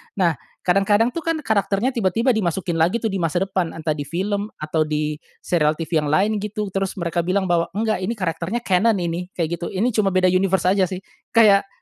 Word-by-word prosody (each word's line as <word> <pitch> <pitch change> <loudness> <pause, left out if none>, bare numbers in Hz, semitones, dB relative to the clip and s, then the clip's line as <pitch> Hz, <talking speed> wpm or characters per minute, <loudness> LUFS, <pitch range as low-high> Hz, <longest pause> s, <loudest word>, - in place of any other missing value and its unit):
Nah, 175 -5 +1 0.2
kadang-kadang, 205 +5 +3
tuh, 335 - -4
kan, 330 0 -1
karakternya 210 +3 +1
tiba-tiba 230 +2 +1
dimasukin 175 -5 -1
lagi, 180 +9 +1
tuh, 220 - 0
di 195 - -2
masa 175 +2 0
depan, 185 -3 -2
entah 160 -1 -2
di 145 -2 -4
film 200 +5 -2
atau 155 0 -1
di 150 0 -2 0.2
serial 155 -3 +2
TV 160 0 -1
yang 150 - -2
lain 200 +8 +2
gitu, 210 0 -4
terus 195 0 -2
mereka 170 -1 -2
bilang 190 +1 +1
bahwa, 170 -1 +2
"Enggak 215 -2 0
ini 200 +6 -2
karakternya 185 +4 -3
canon 210 +4 +3
ini." 170 +1 -3
Kayak 170 0 -2
gitu, 175 - -4
"Ini 225 +7 0
cuma 200 -4 +1
beda 185 -1 +4
universe 190 -1 +2
aja, 190 -2 +2
sih." 185 +1 -6 0.3
Kayak, 200 -3 +6
190 Hz, 205 wpm, -21 LUFS, 170-210 Hz, 0.3 s, Kayak